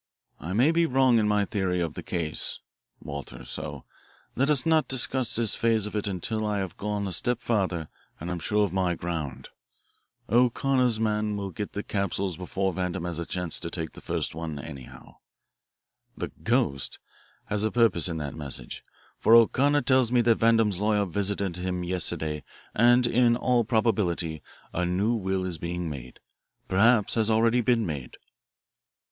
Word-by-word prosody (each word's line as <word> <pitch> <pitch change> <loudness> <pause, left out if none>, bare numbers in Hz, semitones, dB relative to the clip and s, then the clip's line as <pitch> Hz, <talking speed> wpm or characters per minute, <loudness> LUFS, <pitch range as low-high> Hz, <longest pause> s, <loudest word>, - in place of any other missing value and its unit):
I 85 +6 -5
may 125 +9 +4
be 165 0 +2
wrong 130 -3 +4
in 105 - +2
my 105 -1 +2
theory 95 -3 -1
of 85 -3 -2
the - - -6
case, 80 -3 -2 0.5
Walter, 70 -4 -7
so 70 -3 -6 0.5
let 135 +4 +1
us 140 -4 +2
not 160 -1 +3
discuss 130 -1 0
this 115 -2 0
phase 115 -2 +1
of 105 - -6
it 105 0 -1
until 100 +3 -2
I 105 -1 0
have 95 -4 -3
gone 105 -1 -2
a - - -4
step 120 +11 +1
farther 95 -9 -1 0.3
and 85 +3 -5
am 90 - -3
sure 105 +6 +1
of 100 -4 -1
my 90 -2 +1
ground. 75 -7 -5 0.8
O'Connor's 125 0 +2
man 105 -1 0
will 100 -1 -4
get 105 +3 -5
the 100 - -3
capsules 100 -2 -2
before 95 +2 -2
Vandam 90 0 -3
has 85 -2 -3
a 85 - -4
chance 90 -2 -2
to 85 - -4
take 80 -2 -4
the - - -12
first - - -2
one, 80 -1 -5
anyhow. 70 -3 -10 1.0
The - - -3
'ghost' 70 -1 -1 0.5
had 105 0 -1
a 110 - +2
purpose 115 -9 +3
in 85 -2 -3
that 75 -3 -4
message, 70 -5 -6 0.4
for 115 - +6
O'Connor 140 +5 +4
tells 130 -1 +3
me 125 -1 +4
that 115 -1 +3
Vandam's 115 -4 +3
lawyer 105 0 +2
visited 100 0 -1
him 90 0 -3
yesterday 80 -4 -1 0.3
and 120 +2 +5
in 120 0 +3
all 125 -1 +2
probability 100 -8 0 0.3
a 90 - 0
new 95 +6 +1
will 95 -4 -1
is 85 -4 -4
being 85 -1 -3
made, 65 -3 -9 0.5
perhaps 105 +3 +4
has 110 -1 +2
already 115 +2 +3
been 120 -1 +2
made." 70 -6 -5
100 Hz, 170 wpm, -27 LUFS, 85-115 Hz, 1.0 s, for